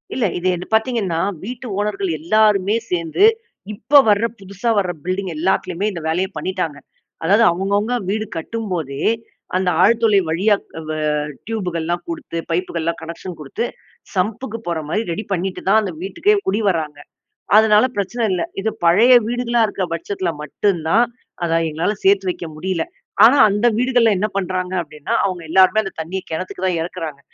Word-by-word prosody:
இல்ல. 250 - +1
இது 175 - -2
என் 180 - -6
பார்த்தீங்கன்னா, 220 -7 0 0.2
வீட்டு 245 +4 -6
ஓனர்கள் 200 -2 -1
எல்லாருமே 205 +3 +3 0.2
சேர்ந்து, 170 - +2 0.5
இப்ப 275 +7 +5
வர 210 +2 +3
புதுசா 200 +4 -4
வர 185 -3 0
பில்டிங் 185 0 -2
எல்லாத்துலையுமே 185 +3 0
இந்த 170 -4 -6
வேலைய 180 +4 0
பண்ணீட்டாங்க. 160 -3 -3 0.5
அதாவது 200 +7 +4
அவங்கவங்க 200 +6 0
வீடு 215 +2 -1
கட்டும்போதே, 170 -8 -4 0.5
அந்த 185 0 +2
ஆழ்துளை 225 0 +4
வழியா 195 +6 +3 0.3
வ - - -1 0.5
டியூபுகள்லாம் 175 -6 -2
கொடுத்து, 320 - -5
பைப்புகள்லாம், 170 -1 -1
கனெக்க்ஷன் 170 +2 -7
கொடுத்து, 150 +11 -3 0.5
சம்புக்கு 220 +5 -2
போற 170 -2 -1
மாரி 215 - 0
ரெடி 190 +6 -3
பண்ணிட்டு 185 +1 -3
தான், 215 +3 +6
அந்த 195 - -3
வீட்டுக்கே 335 - +1
குடி 205 +3 +1
வராங்க. 155 -5 -2 0.6
அதனால 215 +1 +6
பிரச்சன 225 +4 -1
இல்ல. 180 -2 0 0.2
இது 210 +3 0 0.2
பழைய 215 +10 +6
வீடுகளா 240 0 0
இருக்க 200 -2 -3
பட்சத்துல 180 +2 -3
மட்டும் 190 +4 0
தான், 230 +7 +4 0.4
அதா, 165 -1 +2
எங்களால 165 +7 -1
சேர்த்து 195 -1 +4
வைக்க 180 - -4
முடியல. 180 0 -1 0.4
ஆனா 255 +5 +6
அந்த 205 +3 0
வீடுகள்ல 245 -2 +3
என்ன 205 +3 0
பண்ணுறாங்க 185 -1 -2
அப்படின்னா, 150 -2 -6
அவங்க 185 -3 -2
எல்லாருமே 190 +5 +5
அந்த 195 - -6
தண்ணிய 185 +4 -4
கிணத்துக்கு 185 +3 -4
தான் 175 -3 0
இறக்கிறாங்க. 165 -4 -5
190 Hz, 150 wpm, -20 LUFS, 170-215 Hz, 0.6 s, தான்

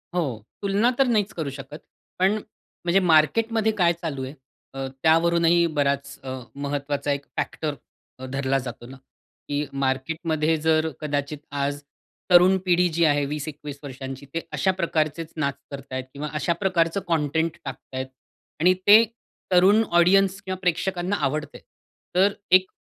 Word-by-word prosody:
हो. 135 - -2 0.2
तुलना 205 +4 +2
तर 270 - +5
नाहीच 215 -4 +1
करू 160 -4 -3
शकत. 135 +2 -9 0.4
पण 190 +2 +4 0.5
म्हणजे 175 +2 +4
मार्केटमध्ये 220 +8 +3
काय 170 -1 +5
चालू 145 -6 -3
आहे 130 - -8 0.4
अ, 135 0 -4 0.2
त्यावरूनही 170 +1 +4
बराच 140 -1 0
अ, 130 -1 -5 0.3
महत्वाचा 145 0 -2
एक 140 0 -2
फॅक्टर 150 -2 -2 0.4
अ, 130 - -7
धरला 135 0 +1
जातो 120 0 -8
ना. 135 +2 -11 0.5
की 145 +1 -1 0.2
मार्केटमध्ये 155 +4 0
जर 160 0 +3
कदाचित 145 0 -2 0.2
आज 145 +1 -2 0.5
तरुण 180 +2 +7
पिढी 180 0 +4
जी 170 - +3
आहे 145 -2 +3
20-21 145 0 -6
वर्षांची 135 0 -7
ते 165 - -1
अशा 190 - +2
प्रकारचेच 160 -1 -1
नाच 140 -3 0 0.2
करतायत 135 -2 -5
किंवा 145 +2 -5
अशा 170 - +1
प्रकारचं 170 -1 +1
कंटेंट 160 0 0
टाकतायत 130 0 -6 0.5
आणि 180 +3 +5
ते 215 +3 +9 0.5
तरुण 190 +5 +5 0.2
ऑडियन्स 195 +2 +4
किंवा 185 0 -4
प्रेक्षकांना 180 +2 0
आवडतंय. 150 +2 -3 0.5
तर 195 +2 +4 0.2
एक 185 0 -8
160 Hz, 140 wpm, -24 LUFS, 140-180 Hz, 0.5 s, ते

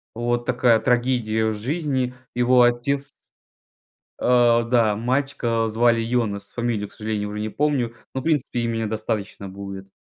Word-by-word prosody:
вот 120 0 -1
такая 115 -3 +4
трагедия 120 -3 +1
в 110 - +1
жизни. 130 +1 -2 0.2
Его 125 0 +4
отец 135 +4 +1 1.1
А, 120 -1 +4
да, 115 -3 +2
мальчика 120 -1 0
звали 115 +1 +3
Йонес, 110 -4 -1
фамилию 115 -4 -1
к - - -21
сожалению 105 -1 -3
уже 105 - -5
не 110 +1 -2
помню, 130 -3 0 0.2
но 130 - -2
в - - -12
принципе 145 -6 0
имени 115 -1 -1
достаточно 105 -2 -3
будет. 95 0 -8
120 Hz, 145 wpm, -23 LUFS, 110-125 Hz, 1.1 s, такая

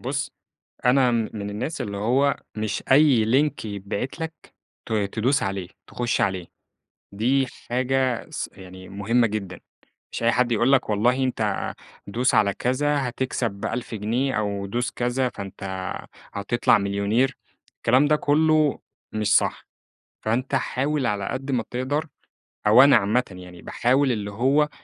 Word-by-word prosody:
بُص 140 +2 -3 0.6
أنا 125 0 +4
م 115 -2 0
من 105 -2 -4
الناس 125 +10 -4
اللي 100 -1 -4
هو 130 +7 +2 0.2
مش 110 -1 -2
أي 135 -5 +6
لينك 135 +3 +1
يتبعت 100 - -4
لك 160 0 -3 0.5
ت 110 - -4
تدُوس 110 +6 +1
عليه، 95 -2 -3 0.2
تخُشّ 120 -1 -1
عليه، 95 -3 -1 0.7
دي 130 +6 +2 0.2
حاجة 130 0 0
س - - -4
يعني 95 -1 -12
مُهمة 110 +5 +1
جدًا، 100 -5 -5 0.5
مش - - -4
أي 115 0 +4
حد 120 0 +2
يقول 120 +4 +3
لك 130 -4 +3
والله 125 +6 +2
أنت 110 -5 -1 0.3
دوس 120 +6 +1
على 100 -1 +3
كذا 140 +2 0
هتكسب 120 -5 -3
1000 120 -1 -4
جنيه، 120 +6 -1
أو 100 -2 -2
دوس 120 +5 -2
كذا 125 +1 0
فأنت 100 -4 -9 0.7
هتطلع 100 +4 +2
مليونير، 100 +6 0 0.4
الكلام 130 +5 +3
ده 150 - +4
كُلّه 155 -1 +3 0.3
مش 105 -1 +2
صح، - - 0 0.6
فأنت 125 +5 -1
حاول 135 +1 0
على 100 -2 -1
قد 135 +1 -4
ما 125 -4 0
تقدر 130 +5 -1 0.6
أو 110 +5 +8
أنا 140 -2 +7
عامةً 110 +4 +2
يعني 90 -1 -11
باحاول 130 - +1
اللي 105 -3 -3
هو 135 +8 +2
120 Hz, 145 wpm, -24 LUFS, 105-135 Hz, 0.7 s, أو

